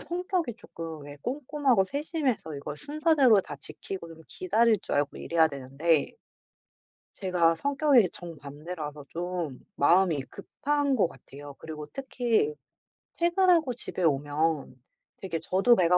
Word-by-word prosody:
성격이 355 - -2
쪼끔 165 -9 -8
왜 145 0 -9
꼼꼼하고 270 -4 +1
세심해서 280 - -2
이걸 145 +1 -6
순서대로 290 - +4
다 - - -8
지키고 185 -3 -7
좀 165 -1 -12
기다릴 215 +3 +2
줄 - - -2
알고 145 0 0
이래야 165 -1 +3
되는데 140 +3 0 1.0
제가 175 -4 +2
성격이 280 - +3
정반대라서 150 -2 -7
좀 170 -5 -4 0.2
마음이 165 -1 +4
급한 285 +7 -1
거 195 -7 +3
같아요. 145 -2 -12
그리고 155 -2 -7
특히 265 - 0 0.6
퇴근하고 345 -5 +3
집에 220 -6 -4
오면 150 0 +1 0.4
되게 170 -4 -4
저도 190 +9 +4
배가 180 -1 +5
185 Hz, 285 characters per minute, -28 LUFS, -, 1.0 s, 배가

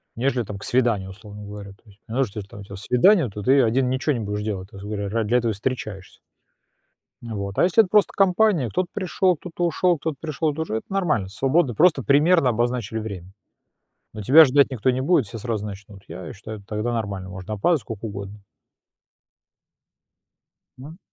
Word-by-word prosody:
нежели 125 0 0
там 100 -1 -7
к - - -10
свиданию, 115 -6 +1
условно 105 +1 -11
говоря, 100 -1 -9
то 100 - -20
есть. 100 -1 -20
Потому 125 +4 0
что 105 0 -8
если 100 - -8
у - - -9
тебя 100 - -12
там 100 - -8
свидание, 125 - +3
то 105 +1 -7
ты 135 +6 +4
один 125 +3 +1
ничего 130 +4 0
не 120 - -2
будешь 105 -1 -3
делать, 95 -3 -4
грубо 100 +1 -10
говоря, 100 -1 -3
ради 110 +1 -1
этого 120 -2 +2
встречаешься. 105 -3 -5 1.0
Ну 115 -2 -7
вот, 100 -1 -5
а - - +4
если 190 +5 +5
это 185 - -7
просто 210 0 +3
компания, 195 - +3
кто-то 180 +6 -1
пришёл, 185 -1 +1
кто-то 175 +2 -4
ушёл, 175 +1 +2
кто-то 155 +1 -3
пришёл, 155 0 -1
это 160 - -4
уже 110 -8 -2
нормально, 165 - 0
свободно, 135 - +1
просто 160 - +4
примерно 145 - +4
обозначили 120 -1 -1
время, 95 -4 -7 0.8
но 110 - -6
тебя 150 +10 +8
ждать 140 +1 +3
никто 130 -1 0
не 130 +1 -2
будет, 145 -2 +3
все 110 +3 -8
сразу 110 -2 -3
начнут. 100 -1 -10
Я 85 0 -8
считаю, 110 0 -9
тогда 105 +4 -3
нормально, 100 -4 -4
можно 95 +3 -6
опаздывать 150 - +2
сколько 110 +1 -7
угодно. 100 0 -7 2.4
М. 150 +7 -11
115 Hz, 185 wpm, -23 LUFS, 100-145 Hz, 2.4 s, тебя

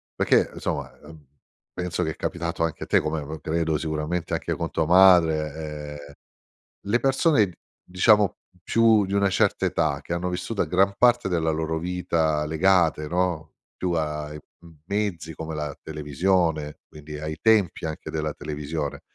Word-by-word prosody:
perché - - +2
insomma, - - -4
ehm, 75 -1 -14 0.5
penso 90 0 -2
che 80 - -1
è - - -8
capitato 85 -1 -3
anche 80 - -2
a - - -5
te - - +3
come 75 0 -2
pro 75 +2 -7
credo 80 0 -1
sicuramente 80 +2 -3
anche - - -1
con - - -3
tua 80 - 0
madre, 80 -4 +3
ehm, 70 - -13 0.8
le 120 - +4
persone, 135 - +3 0.3
diciamo, 100 +2 +3 0.2
più 110 -1 +4
di 95 - -6
una 100 -1 +3
certa - - +1
età 70 -2 0
che 85 - -7
hanno 85 +1 -1
vissuto 100 +4 -2
a - - 0
gran 95 +2 +2
parte 120 -4 +4
della 80 -3 0
loro 80 +1 -1
vita 80 -3 0
legate, 80 -1 +2
no, 85 -1 -1 0.2
più 90 -1 -2
ai 75 -2 -3
m - - -9 0.5
mezzi 95 -6 -2
come 80 +1 -6
la 75 -2 -4
televisione, 75 0 -1
quindi 75 0 -9
ai 75 +1 -5
tempi 105 -7 +3
anche 80 - -6
della 75 -1 -2
televisione. 75 0 -5
80 Hz, 160 wpm, -24 LUFS, 75-90 Hz, 0.8 s, le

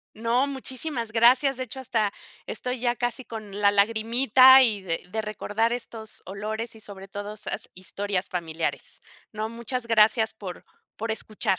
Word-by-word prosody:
No, 235 +4 +1
muchísimas 265 -3 -4
gracias. 250 +4 +5
De 255 - -2
hecho, 255 +2 -8
hasta 220 -5 0 0.3
estoy 250 0 -3
ya 240 0 +1
casi 245 +1 -2
con 210 -3 -7
la 200 0 +5
lagrimita 230 +5 +6
y 215 -5 +3
de 170 -3 -3
de 220 0 -2
recordar 215 +2 -1
estos 225 -3 -6
olores 215 +4 -5
y - - -14
sobre 195 -2 -10
todo 205 +1 -6
esas 215 - -5
historias 195 +1 -3
familiares. 165 -3 -3 0.3
No, 215 0 -3
muchas 235 +1 -3
gracias 220 0 +4
por 190 -5 -8 0.3
por 225 +1 -3
escuchar. 215 -3 -1
220 Hz, 155 wpm, -26 LUFS, 205-245 Hz, 0.3 s, lagrimita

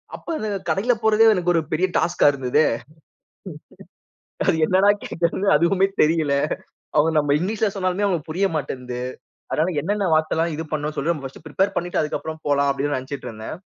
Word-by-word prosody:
அப்ப - - -14
அந்தக் 205 -5 -4
கடைல 225 +6 +2
போறதே 220 0 +4
எனக்கு 175 -1 +1
ஒரு 165 - +3
பெரிய 175 +4 +2
டாஸ்கா 175 -3 +2
இருந்ததே. 135 +2 +1 2.0
என்னடா 190 +4 +4
கேக்குறது 170 +4 -1
அதுவுமே 185 +5 +3
தெரியல. 155 -2 +2 0.6
அவங்க 160 +2 +4
நம்ம 145 -1 +3
இங்கிலிஷ்ல 210 +4 0
சொன்னாலுமே 185 +1 0
அவங்களுக்கு 175 -6 -1
புரிய 195 +4 +1
மாட்டேன்து. 125 -4 -4 0.5
அதனால 165 +4 +1
என்னென்ன 205 0 0
வார்த்தலாம் 160 +1 +1
இது 160 +2 -5
பண்ணணுனு 150 0 -2
சொல்லுங்க, 170 +4 0
நான் 135 - -9
பஸ்டு 130 - -15
பிரிப்பேர் 190 +6 0
பண்ணிட்டு 175 0 0
அதுக்கப்புறம் 155 +1 -4
போலாம் 140 -1 +2
அப்டின்னு 145 +1 -1
நெனச்சுட்டு 130 0 -6
இருந்தேன். 110 +6 -7
165 Hz, 155 wpm, -22 LUFS, 145-190 Hz, 2.0 s, போறதே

